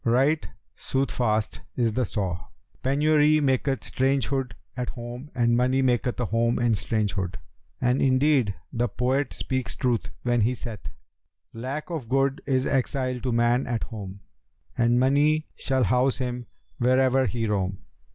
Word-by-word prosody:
Right 135 +6 +2 0.3
soothfast 120 -5 -1 0.2
is 115 -3 +1
the 125 +2 +1
saw, 95 -5 -3 0.3
'Penury 150 +2 +4
maketh 135 -3 +1
strangerhood 135 -2 0 0.2
at 125 -1 -3
home 120 +3 -7
and 120 -1 +3
money 130 +2 +2
maketh 125 -1 +1
a 120 - +1
home 115 +2 +1
in 120 -1 +2
strangerhood'; 100 -2 -1 0.4
and 125 +1 +2
indeed 130 -5 +3 0.2
the 120 +1 +1
poet 125 +5 0
speaks 130 -2 -2
truth 120 -3 0
when 120 -1 +2
he 120 +4 +2
saith, 115 -5 -7 0.6
'Lack 135 +9 -5
of 145 -9 -4
good 135 +1 +1
is 130 -1 +2
exile 130 -1 0
to 125 0 -2
man 120 +2 +2
at 120 -2 -1
home; 100 -4 -7 0.3
* - - -40
And 120 +1 +3
money 145 +4 +3
shall 130 -1 0
house 125 +4 +2
him 125 -2 -4 0.3
where'er 130 +1 +3
he 115 +2 -2
roam.' 95 -3 -1
125 Hz, 145 wpm, -26 LUFS, 115-135 Hz, 0.6 s, Penury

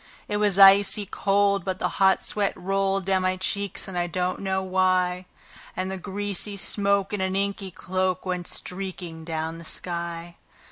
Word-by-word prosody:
It 210 - -1
was 205 -2 +2
icy 200 +1 +7
cold, 200 0 +1
but 190 -1 -2
the - - 0
hot 190 0 +4
sweat 205 -2 +1
rolled 195 0 0
down 190 -1 +2
my 185 0 0
cheeks, 200 +1 -1
and 190 - -7
I 175 0 0
don't 180 +1 -2
know 190 -1 -1
why; 185 -1 +1 0.5
And 185 +1 -2
the 190 - -4
greasy 200 +1 -3
smoke 200 0 0
in 205 - -1
an 190 0 -1
inky 200 0 -2
cloak 185 +1 -2
went 180 -2 -3
streaking 180 -3 -5
down 160 0 -4
the - - -10
sky. 170 0 -4
190 Hz, 170 wpm, -25 LUFS, 180-195 Hz, 0.5 s, icy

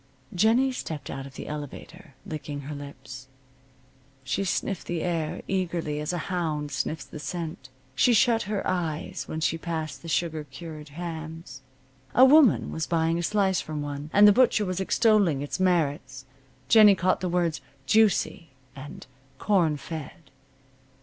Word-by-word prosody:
Jennie 225 +8 +3
stepped 155 - -6
out 135 0 -6
of 135 - -15
the - - -7
elevator, 150 +2 -8
licking 145 -2 -6
her 145 +2 -7
lips. 130 -3 -9 1.0
She 135 +9 -1
sniffed 195 0 -2
the 170 -2 -2
air, 165 -3 -2
eagerly, 170 -5 -2
as 150 +2 -2
a 175 - -2 0.2
hound 155 -4 -2
sniffs 145 +3 -3
the 155 - -10
scent. 155 -2 -6 0.2
She 145 - +3
shut 225 +1 +4
her 210 -2 -2
eyes 165 -4 -2
when 160 - -4
she 165 +1 0
passed 160 -5 -4
the - - -10
sugar 160 -1 -1
cured 150 +2 -10
hams. 160 -3 -7 0.5
A 255 - +8
woman 280 -4 +5
was 160 - -3
buying 165 0 +1
a - - -1
slice 190 +1 +1
from 150 -1 -5
one, 145 +1 -6
and 205 +1 +7
the - - +9
butcher 230 -3 +3
was 185 -1 -3
extolling 195 - +2
its 145 - -4
merits. 145 -8 0 0.4
Jennie 210 - +7
caught 185 0 +1
the 185 - -1
words 170 -2 0 0.2
"juicy" 210 -6 +2 0.3
and 140 +2 -10 0.3
"corn 170 -7 +2
fed." 160 +1 -9
165 Hz, 155 wpm, -26 LUFS, 150-185 Hz, 1.0 s, the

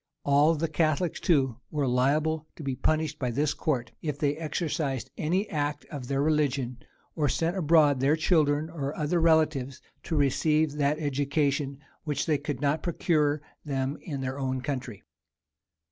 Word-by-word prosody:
All 145 +3 +4
the 160 +2 -1
Catholics, 160 +2 0
too, 135 -9 +2
were 145 -3 -1
liable 150 +5 +1
to 160 - -9
be 135 -2 -2
punished 155 +2 0
by 125 -3 -1
this 145 +5 0
court, 125 -7 -2
if 150 -3 -3
they 145 -1 +1
exercised 155 -4 -2
any 185 +7 0
act 145 -3 -2
of 135 -4 -6
their 140 +1 0
religion, 140 -5 0 0.4
or 150 -3 +1
sent 165 +6 0
abroad 155 -5 +4
their 140 +4 +3
children 155 -2 +2
or 145 -3 -4
other 165 +2 +1
relations 155 -5 +2 0.3
to 160 - -2
receive 150 +2 +2
that 145 0 +1
education 145 -1 0 0.3
which 145 -3 -1
they 155 -3 +1
could 145 -3 -4
not 145 +2 +1
procure 150 -4 +1 0.2
them 135 -1 -2
in 140 -6 -5
their 130 +1 -3
own 130 -1 -1
country. 125 -6 -5
145 Hz, 160 wpm, -28 LUFS, 140-155 Hz, 0.4 s, All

